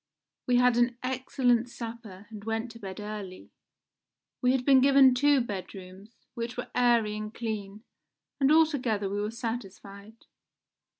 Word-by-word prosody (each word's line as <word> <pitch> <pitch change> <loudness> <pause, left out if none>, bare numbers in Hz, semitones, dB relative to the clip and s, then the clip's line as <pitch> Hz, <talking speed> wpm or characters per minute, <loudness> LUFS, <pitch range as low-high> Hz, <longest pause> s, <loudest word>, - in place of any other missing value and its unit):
We 250 - +3
had 245 -1 +4
an 240 0 +2
excellent 255 -2 0
supper 225 -5 -9
and 210 -2 -9
went 225 +2 -3
to 230 - -13
bed 190 -3 -8
early. 205 -3 -8 0.9
We 250 -1 +3
had 260 -1 0
been 270 -2 +6
given 270 -1 +6
two 285 +1 +3
bedrooms, 195 0 -9
which 235 +1 -5
were 245 - -6
airy 235 -4 +2
and 215 0 -5
clean, 215 -2 -6 0.6
and 275 +1 +3
altogether 265 -10 +2
we 205 +1 -2
were 210 - -2
satisfied. 220 -2 -8
230 Hz, 140 wpm, -28 LUFS, 210-250 Hz, 0.9 s, been